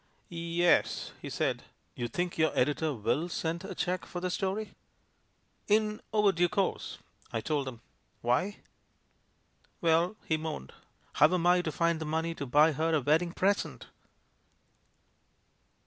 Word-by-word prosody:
"Y 170 Hz, -, -6 dB
e 170 Hz, +1 st, -1 dB
s," 175 Hz, -, +3 dB
he -, -, -6 dB
said.... -, -, -1 dB, 0.3 s
"You 120 Hz, -, -3 dB
think 175 Hz, +7 st, -2 dB
your 160 Hz, 0 st, +3 dB
editor 150 Hz, +4 st, +2 dB
mil 145 Hz, +10 st, 0 dB
send 170 Hz, +1 st, -2 dB
a 190 Hz, -1 st, -6 dB
cheque 180 Hz, +1 st, -2 dB
for 175 Hz, -, -5 dB
the 180 Hz, 0 st, -2 dB
story?" 195 Hz, +4 st, -2 dB, 0.9 s
"In 215 Hz, 0 st, +2 dB
overdue 195 Hz, -5 st, +3 dB
course," 195 Hz, +2 st, -1 dB, 0.3 s
I 115 Hz, -, -1 dB
told 140 Hz, +4 st, -1 dB
him. 120 Hz, -3 st, -7 dB, 0.4 s
"Why?" 130 Hz, -, 0 dB, 1.2 s
"Well," 170 Hz, +4 st, +2 dB
he 160 Hz, -, +1 dB
moaned, 155 Hz, -, -5 dB, 0.4 s
"how 150 Hz, -, +5 dB
am 180 Hz, -2 st, +1 dB
I 180 Hz, 0 st, +5 dB
to 160 Hz, -, -3 dB
find 170 Hz, 0 st, +1 dB
the -, -, -2 dB
money 160 Hz, +2 st, -1 dB
to 140 Hz, -4 st, -6 dB
buy 150 Hz, +5 st, +5 dB
her 160 Hz, +2 st, +1 dB
a 150 Hz, -, +2 dB
wedding 160 Hz, +5 st, +2 dB
present?" 195 Hz, +3 st, -1 dB
165 Hz, 150 wpm, -30 LUFS, 155-180 Hz, 1.2 s, how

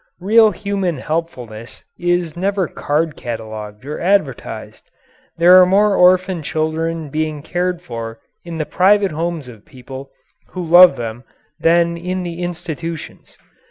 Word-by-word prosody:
Real 220 Hz, +4 st, +5 dB
human 195 Hz, -4 st, -2 dB
helpfulness 125 Hz, -8 st, -5 dB, 0.2 s
is 175 Hz, -2 st, 0 dB
never 190 Hz, 0 st, 0 dB
card 150 Hz, +2 st, -1 dB
catalogued 110 Hz, -2 st, -7 dB
or 150 Hz, +2 st, -5 dB
advertised. 180 Hz, -, -2 dB, 0.5 s
There 180 Hz, +2 st, +8 dB
are -, -, +7 dB
more 200 Hz, +2 st, +3 dB
orphan 185 Hz, -1 st, +4 dB
children 160 Hz, +1 st, -2 dB
being 155 Hz, -1 st, -2 dB
cared 180 Hz, +1 st, -2 dB
for 115 Hz, -6 st, -6 dB, 0.3 s
in 170 Hz, -1 st, -7 dB
the 155 Hz, -, -2 dB
private 195 Hz, +3 st, +3 dB
homes 165 Hz, -2 st, -3 dB
of 115 Hz, -4 st, -13 dB
people 130 Hz, +1 st, -11 dB, 0.4 s
who 180 Hz, -2 st, -4 dB
love 175 Hz, -1 st, +8 dB
them 120 Hz, 0 st, -6 dB, 0.4 s
than 170 Hz, 0 st, +3 dB
in 180 Hz, +2 st, -3 dB
the 175 Hz, 0 st, -6 dB
institutions. 170 Hz, -2 st, -6 dB
165 Hz, 130 wpm, -18 LUFS, 140-180 Hz, 0.5 s, There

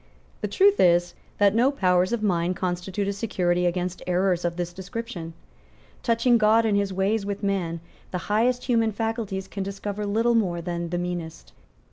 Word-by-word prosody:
The 210 Hz, -, -1 dB
truth 395 Hz, -, +4 dB
is 175 Hz, 0 st, +4 dB, 0.2 s
that 200 Hz, -1 st, +4 dB
no 240 Hz, +4 st, +4 dB
powers 185 Hz, -7 st, +2 dB
of 235 Hz, -2 st, -1 dB
mind 180 Hz, -2 st, +1 dB
constitute 185 Hz, +2 st, -2 dB
a 200 Hz, -, 0 dB
security 180 Hz, -4 st, 0 dB
against 180 Hz, +1 st, -2 dB
errors 180 Hz, 0 st, +1 dB
of 170 Hz, 0 st, -2 dB
this 175 Hz, -1 st, -3 dB
description. 190 Hz, -3 st, -6 dB, 0.7 s
Touching 235 Hz, +1 st, +3 dB
God 220 Hz, +1 st, +4 dB
and 215 Hz, -2 st, +2 dB
His 200 Hz, -1 st, +1 dB
ways 195 Hz, +3 st, 0 dB
with 200 Hz, +1 st, -4 dB
man, 175 Hz, -5 st, -1 dB, 0.3 s
the 180 Hz, -, -3 dB
highest 240 Hz, +4 st, +1 dB
human 230 Hz, -3 st, +2 dB
faculties 215 Hz, -3 st, -3 dB
can 200 Hz, -, -6 dB
discover 200 Hz, +1 st, -4 dB
little 225 Hz, +4 st, +2 dB
more 185 Hz, -7 st, +1 dB
than 170 Hz, 0 st, -4 dB
the 175 Hz, -, -2 dB
meanest. 175 Hz, -2 st, -5 dB
195 Hz, 170 wpm, -25 LUFS, 175-220 Hz, 0.7 s, truth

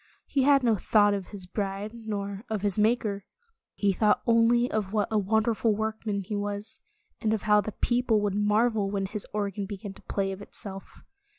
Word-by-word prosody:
He 275 Hz, -, 0 dB
had 275 Hz, 0 st, +5 dB
no 230 Hz, -3 st, +3 dB
thought 205 Hz, +1 st, +4 dB
of 195 Hz, -2 st, -3 dB
his 200 Hz, -3 st, -8 dB
bride 200 Hz, +2 st, -3 dB
nor 205 Hz, -3 st, -5 dB
of 215 Hz, -2 st, -2 dB
his 205 Hz, 0 st, +1 dB
Maker. 210 Hz, -2 st, +1 dB, 0.5 s
He 200 Hz, -1 st, +2 dB
thought 210 Hz, +2 st, +2 dB
only 235 Hz, +1 st, +4 dB
of 210 Hz, -2 st, -2 dB
what 210 Hz, -2 st, +1 dB
a 215 Hz, -, +3 dB
wonderful 220 Hz, +2 st, +1 dB
workman 220 Hz, -1 st, -2 dB
he 210 Hz, +3 st, -4 dB
was, 205 Hz, +1 st, -4 dB, 0.4 s
and 220 Hz, -2 st, +1 dB
of 215 Hz, -, -6 dB
how 210 Hz, 0 st, +5 dB
the 215 Hz, -, -5 dB
people 240 Hz, -3 st, +1 dB
would 205 Hz, -2 st, 0 dB
marvel 210 Hz, 0 st, +2 dB
when 195 Hz, -1 st, -1 dB
his 210 Hz, +1 st, -4 dB
organ 200 Hz, -1 st, -2 dB
began 200 Hz, -1 st, -7 dB
to -, -, -16 dB
play 195 Hz, -1 st, -2 dB
of 190 Hz, +1 st, -7 dB
itself. 195 Hz, -1 st, -7 dB
210 Hz, 190 wpm, -27 LUFS, 200-220 Hz, 0.5 s, had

